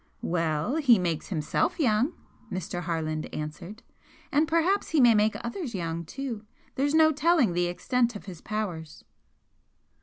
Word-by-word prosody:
"Well, 165 - 0
he 260 -8 +5
makes 170 -4 -2
HIMSELF 185 - -1
young," 250 +2 +2 0.4
Mr. 180 -1 -4
Harland 160 -2 -3
answered 160 +8 -7 0.5
"And 300 +2 +3
perhaps 335 +5 +1
he 320 - +2
may 240 -3 +7
make 215 0 +3
others 235 - -4
young 170 -2 -3
too. 245 - -5 0.3
There's 285 +3 0
no 315 0 +6
telling 305 - +3
the 175 0 +1
extent 240 +6 0
of 205 - -8
his 180 -5 -9
powers!" 180 -8 -5
215 Hz, 145 wpm, -27 LUFS, 170-275 Hz, 0.5 s, may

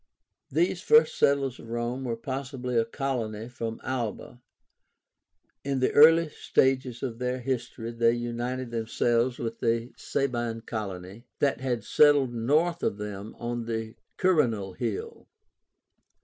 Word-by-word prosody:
These 175 +4 +1
first 460 - +5
settlers 140 -2 +2
of 115 - -11
Rome 120 +3 -3
were 120 -2 -1
possibly 130 0 -4
a 115 -1 +3
colony 115 -4 -3
from 115 -2 -5
Alba. 120 -1 -4 1.2
In 135 -1 -1
the 130 - +2
early 165 +2 +7
stages 130 -4 +1
of 120 -3 -4
their 125 0 -1
history 120 -2 -3
they 115 0 +3
united 120 +1 -3
themselves 120 +2 +1
with 115 -1 -5
a 115 +1 0
Sabine 120 -4 -2
colony 105 0 -6
that 140 -2 +1
had 120 -4 -1
settled 145 -1 +4
north 155 +9 +1
of 100 - 0
them 105 0 -6
on 120 0 -3
the 115 -1 -3 0.2
QUIRÍNAL 115 - +2
HILL. 115 -5 -4
120 Hz, 130 wpm, -27 LUFS, 115-135 Hz, 1.2 s, early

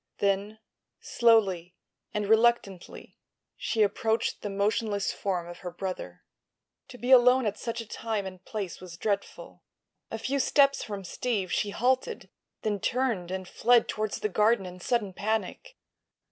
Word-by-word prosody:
Then, 200 +2 0 0.4
slowly 195 -7 +2 0.4
and 210 -1 -2
reluctantly, 220 -4 +1 0.4
she 220 -2 +1
approached 220 +2 0
the 205 - -4
motionless 205 +1 0
form 180 -4 -2
of 175 0 -9
her 180 - -5
brother. 185 +1 -6 0.6
To 265 -2 -11
be 245 +2 -2
alone 250 0 +7
at 210 0 -2
such 230 0 -3
a 225 - -10
time 220 -2 -3
and 185 -1 -9
place 200 -6 -5
was 175 -2 -10
dreadful. 200 +2 -3 0.5
A 225 - -4
few 270 +5 -1
steps 275 +1 +3
from 200 -2 -6
Steve 200 0 -2
she 205 - 0
halted; 260 - -1 0.3
then 210 -2 0
turned 230 -7 -1
and 185 0 -4
fled 240 +3 +3
toward 215 -1 -2
the - - -1
garden 210 0 +2
in 180 0 -9
sudden 205 0 -1
panic. 220 - -3
210 Hz, 145 wpm, -28 LUFS, 190-235 Hz, 0.6 s, alone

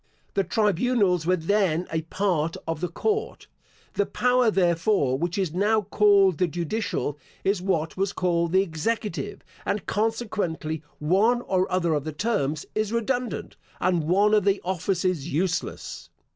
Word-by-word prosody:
The 195 - +2
tribunals 205 -4 +1
were 185 - +4
then 180 -1 +1
a 160 0 0
part 165 -2 -1
of 165 -1 -3
the 180 - 0
court. 430 - -2 0.5
The 200 - 0
power, 250 -1 +3
therefore, 175 -6 +2
which 175 +6 -2
is 185 -5 -1
now 210 +4 +2
called 200 -3 +4
the 180 - +3
judicial, 170 -3 -2 0.2
is 195 -1 +1
what 170 -4 -1
was 195 0 0
called 170 -3 0
the 190 +1 +4
executive 170 - -3 0.2
and, 205 - -2
consequently, 205 -8 -2 0.2
one 205 +10 +2
or 185 -4 0
other 175 -3 +1
of 145 -2 0
the 155 +1 -5
terms 155 -5 -1
is 215 -1 -1
redundant, 240 +1 -2 0.2
and 175 -3 +1
one 200 +6 +3
of 210 -2 +4
the 200 0 +2
offices 180 -3 -1
useless. 175 +4 -2
185 Hz, 145 wpm, -25 LUFS, 165-210 Hz, 0.5 s, were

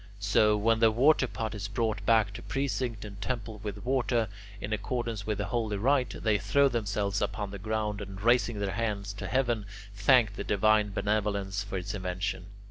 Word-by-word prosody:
So, 105 +1 +3
when 110 +2 +2
the 115 -1 +5
waterpot 120 -3 +2
is 100 -2 -4
brought 110 0 -1
back 110 -3 +4
to 115 - -7
precinct 125 -5 -2
and 100 -1 -9
temple 110 -1 -4
with 105 +2 -6
water, 120 -4 +1 0.3
in 105 +1 -3
accordance 115 -1 -3
with 105 -2 0
the - - -2
holy 110 -4 -1
rite, 125 0 +1
they 105 -2 +3
throw 140 0 +3
themselves 100 -4 -1
upon 105 -3 -2
the 100 - -7
ground 105 0 -2
and, 100 -1 -7
raising 120 +1 +3
their 100 -1 -1
hands 105 -2 -2
to 100 - -6
heaven, 120 -6 0 0.3
thank 110 +1 +4
the 100 - -5
divine 105 +1 +3
benevolence 100 -1 -1
for 100 -1 -4
its 90 - -4
invention. 95 -1 -3
105 Hz, 180 wpm, -29 LUFS, 100-115 Hz, 0.3 s, the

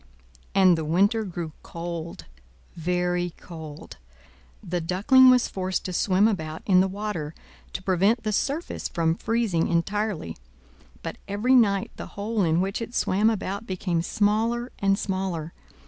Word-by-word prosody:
And 185 -2 +6
the - - -2
winter 200 +8 +2
grew 175 -5 -5
cold, 170 -1 -6 0.5
very 175 +1 -1
cold! 155 - -10 0.7
The 175 0 -2
Duckling 215 - +5
was 250 -1 +5
forced 185 -1 -3
to 185 - -4
swim 190 +3 +3
about 160 -7 -3
in 185 -3 +5
the 190 - +4
water, 190 -6 -4 0.4
to 185 - -5
prevent 195 +5 +2
the 215 -1 -1
surface 290 - -2
from 165 -1 +1
freezing 215 -3 0
entirely; 185 - -1 0.7
but - - -6
every 205 +6 +1
night 200 -6 +3
the - - -6
hole 210 +1 -1
in 165 0 +2
which 195 +4 -2
it 230 +1 -6
swam 205 +4 +2
about 200 0 -3
became 180 -2 -1
smaller 225 +6 0
and 195 0 +2
smaller. 185 -5 -3
190 Hz, 145 wpm, -25 LUFS, 170-215 Hz, 0.7 s, And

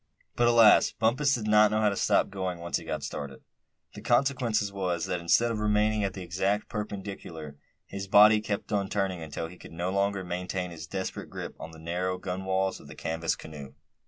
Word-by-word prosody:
But 120 - +3
alas! 115 -2 +6
Bumpus 135 +5 +2
did 115 -3 -4
not 105 0 +5
know 110 +1 0
how 105 - +4
to 100 - -2
stop 100 - +2
going, 95 -2 -3
once 85 0 -2
he - - -9
got - - -4
started. 70 -2 -6 0.5
The - - -9
consequence 120 -5 +1
was, 90 -4 -2
that 90 - -2
instead 115 +8 +3
of 110 - -2
remaining 105 0 +2
at 100 0 -3
an 95 - -5
exact 95 +4 -1
perpendicular, 95 -8 -6 0.3
his 95 0 -6
body 105 +2 +7
kept 105 -1 -4
on 100 -2 0
turning 95 -4 -1
until 80 0 -5
he 85 +2 -11
could - - -12
no 85 +3 -2
longer 100 0 0
maintain 90 0 -3
his 80 -2 -8
desperate 95 +2 -5
grip - - -7
on 80 - -7
the 80 - -13
narrow 90 +3 -2
gunwales 95 +1 -2
of - - -14
the - - -11
canvas 80 +1 -2
canoe. 70 -4 -10
95 Hz, 200 wpm, -28 LUFS, 85-105 Hz, 0.5 s, body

